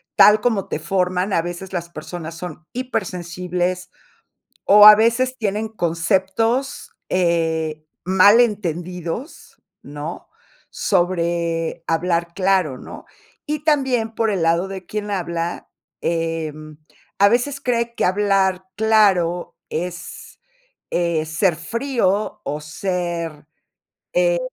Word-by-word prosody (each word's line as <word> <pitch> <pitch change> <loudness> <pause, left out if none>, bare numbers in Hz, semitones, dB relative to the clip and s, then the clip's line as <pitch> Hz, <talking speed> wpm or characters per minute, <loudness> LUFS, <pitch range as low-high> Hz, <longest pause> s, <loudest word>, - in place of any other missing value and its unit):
tal 210 +1 +7
como 210 -4 0
te - - -2
forman, 180 +3 0
a 165 - +3
veces 175 +3 -7
las 170 -1 -3
personas 165 0 -7
son 165 -2 -8
hipersensibles, 180 -6 -3 0.8
o 210 +1 +9
a 210 - +11
veces 235 +4 +1
tienen 215 0 -2
conceptos, 195 - 0 0.2
eh, 160 -3 0 0.2
mal 190 +4 +6
entendidos, 180 - -3 0.2
¿no?, 145 +3 -7 0.4
sobre 170 -3 0
hablar 170 0 0
claro, 185 -8 +1
¿no? - - -10 0.4
Y 300 0 -3
también 265 -7 +1
por 225 0 +1
el 190 -5 -1
lado 170 +3 +2
de 190 -1 -7
quien 210 +2 -4
habla, 170 -3 -3 0.3
em, 160 -2 -3 0.4
a 200 +1 +6
veces 250 +5 0
cree 235 -2 -1
que - - +1
hablar 190 -1 +1
claro 200 -6 +2
es, 175 +2 -6 0.5
eh, 170 -2 0
ser 160 +3 +1
frío 215 - -1
o 150 +2 -4
ser, 170 -2 -4 0.7
eh, - - +2
180 Hz, 110 wpm, -21 LUFS, 170-210 Hz, 0.8 s, a